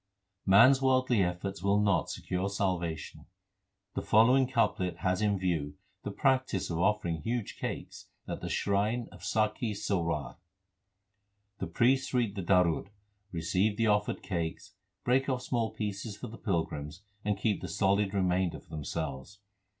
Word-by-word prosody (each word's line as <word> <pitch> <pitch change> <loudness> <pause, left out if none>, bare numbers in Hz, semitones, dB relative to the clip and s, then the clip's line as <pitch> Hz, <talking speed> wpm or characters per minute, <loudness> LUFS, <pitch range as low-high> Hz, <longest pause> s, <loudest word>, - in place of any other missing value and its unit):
1 - - -3
Man 130 - +9
s 135 -1 +1
worldly 130 -4 +3
efforts 90 +2 -2
will 100 +2 +3
not 100 -2 +2
secure 90 +2 -2
salvation. 90 -5 -3 0.7
The - - -2
following 125 +5 +5
couplet 105 -7 0
has 90 +1 +1
in 105 -2 +2
view 80 -6 -1 0.3
the - - -4
practice 130 - +1
of 85 - -2
offering 90 -4 +1
huge 115 +4 -3
cakes - - -5 0.2
at - - -5
the - - -4
shrine 105 +4 0
of - - -13
Sakhi 110 0 0
Sarwar. 85 -9 -2 1.2
The - - -3
priests 130 +2 +2
read 115 -5 +1
the 100 - -4
darud, 90 -2 +3
2 - - -23 0.4
receive 95 +5 0
the 115 - +2
offered 105 -2 +1
cakes, 85 -2 -4 0.3
break 130 +2 +2
off 125 -1 -1
small 115 -3 0
pieces 105 0 -4
for - - -7
the 115 - -10
pilgrims, 80 - -3 0.2
and 105 -1 0
keep 105 -4 0
the 90 - -4
solid 100 +3 +1
remainder 90 -2 +1
for - - -25
themselves. 75 +3 -5
100 Hz, 155 wpm, -30 LUFS, 90-115 Hz, 1.2 s, Man